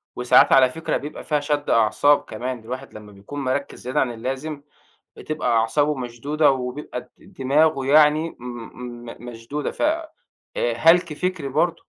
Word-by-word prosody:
وساعات 125 0 +5
على 130 -1 +6
فكرة 160 +5 -2
بيبقى 150 +2 -8
فيها 150 -1 0
شد 145 0 -2
أعصاب 115 +6 +4
كمان، 125 +3 -5
الواحد 130 +4 -8
لمّا 105 -1 -11
بيكون 100 +9 -9
مركّز 135 +1 -2
زيادة 125 +2 -2
عن 125 - +1
اللازم، 135 +6 -5 0.5
بتبقى 155 -4 -4
أعصابه 145 +7 +1
مشدودة، 135 +5 +1
وبيبقى 125 0 -4
د 125 - -21
د - - -19
دماغه 140 +1 +2
يعني 155 +3 +4
م - - -16
م 120 0 -8
م 120 +1 -10
مشدودة، 120 +6 -5
ف - - -9
آآ، 315 +1 +1 0.7
هلَك 165 -1 +4
فكري 180 -3 -3
برضه. 165 +5 +1
135 Hz, 160 wpm, -22 LUFS, 125-150 Hz, 0.7 s, على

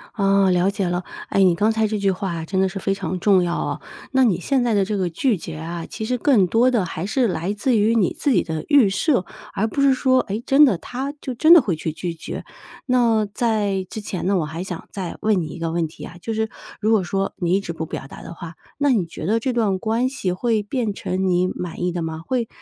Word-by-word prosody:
啊， 195 -2 +3
了 180 +1 +3
解 200 -2 -1
了。 175 +1 -1 0.3
哎， 195 - +2
你 180 -2 +4
刚 210 +5 +2
才 220 0 +1
这 215 0 -2
句 200 -1 +2
话 190 0 -3
啊 165 -1 -4
真 190 +3 0
的 190 - +2
是 195 - -7
非 195 - 0
常 185 -2 -4
重 190 -1 +4
要 175 0 -1
哦。 - - -3 0.3
那 265 -1 +4
你 200 -8 +2
现 260 +7 +1
在 235 -3 +1
的 200 -1 +3
这 210 +2 -2
个 185 -3 0
拒绝 170 - -1
啊， 165 +1 -5
其 220 - -5
实 250 +2 -1
更 235 -7 +4
多 230 +7 +3
的 230 -7 +1
还 165 -1 -5
是 240 +4 +1
来 180 0 -2
自 235 +4 +1
于 220 +2 +3
你 205 -6 +2
自 - - 0
己 - - +3
的 160 -1 -4
预 280 -9 +5
设， 195 - +1 0.3
而 220 - +1
不 275 - -2
是 275 -1 +5
说， 260 0 +3
诶， 205 +2 -4
真 285 +2 +6
的 240 -10 +2
他 260 +9 -5
就 260 - -5
真 310 +7 +4
的 345 - +10
会 190 -8 0
去 160 +1 -3
拒 170 +2 -4
绝。 165 - -7 0.4
那 235 -4 +3
在 205 -4 0
之 215 - -6
前 185 -3 -4
呢， 195 0 +2
我 165 - 0
还 160 +4 -5
想 180 -3 -7
再 185 -4 -5
问 210 -4 +2
你 160 - -4
一 155 - -8
个 165 -1 -2
问 165 -1 0
题 155 - -12
啊， - - -11
就 225 - -4
是 220 0 0 0.3
如 220 +1 +1
果 215 -4 +3
说 195 +2 -2
你 175 -1 0
一 195 - +4
直 170 -4 -5
不 160 -1 -5
表 - - -6
达 - - -11
的 170 - -9
话， 170 0 -8 0.2
那 285 0 +2
你 200 -9 +1
觉 160 - -7
得 220 +5 +2
这 255 +3 -1
段 215 -6 +1
关 225 +5 0
系 260 -9 -2
会 220 +4 0
变 215 0 -2
成 190 -1 -2
你 180 0 +2
满 180 -1 -6
意 180 - +1
的 175 -1 -3
吗？ 160 0 -5
会 240 +3 -1
195 Hz, 285 characters per minute, -22 LUFS, 175-230 Hz, 0.4 s, 的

